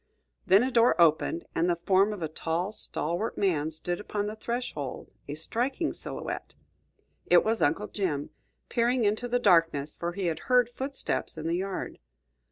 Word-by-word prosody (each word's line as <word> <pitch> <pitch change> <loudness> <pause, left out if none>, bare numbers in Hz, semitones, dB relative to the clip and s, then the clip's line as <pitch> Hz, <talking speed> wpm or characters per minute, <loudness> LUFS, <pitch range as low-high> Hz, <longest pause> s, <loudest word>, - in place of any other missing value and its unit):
Then 195 +5 +6
a 260 - 0
door 235 -4 +4
opened, 165 0 +3
and 170 +2 +1
the 175 - +3
form 190 +4 +3
of 205 -5 -5
a - - 0
tall, 165 +5 -2
stalwart 180 0 -2
man 160 -6 +1
stood 175 +3 -3
upon 205 0 -3
the 210 +1 -4
threshold, 220 - -4 0.2
a 145 - -4
striking 250 - -1
silhouette. - - -6 0.7
It - - +6
was 225 +1 0
Uncle 160 +8 +2
Jim 160 -9 -2 0.4
peering 240 0 +1
into 215 +4 0
the 245 +1 +1
darkness, 165 - +3
for 170 0 -3
he 195 +1 -3
had 165 -2 -1
heard 250 -1 +4
footsteps 265 - -3
in 155 - -5
the 165 +1 0
yard. 190 0 -4
190 Hz, 170 wpm, -28 LUFS, 165-230 Hz, 0.7 s, Then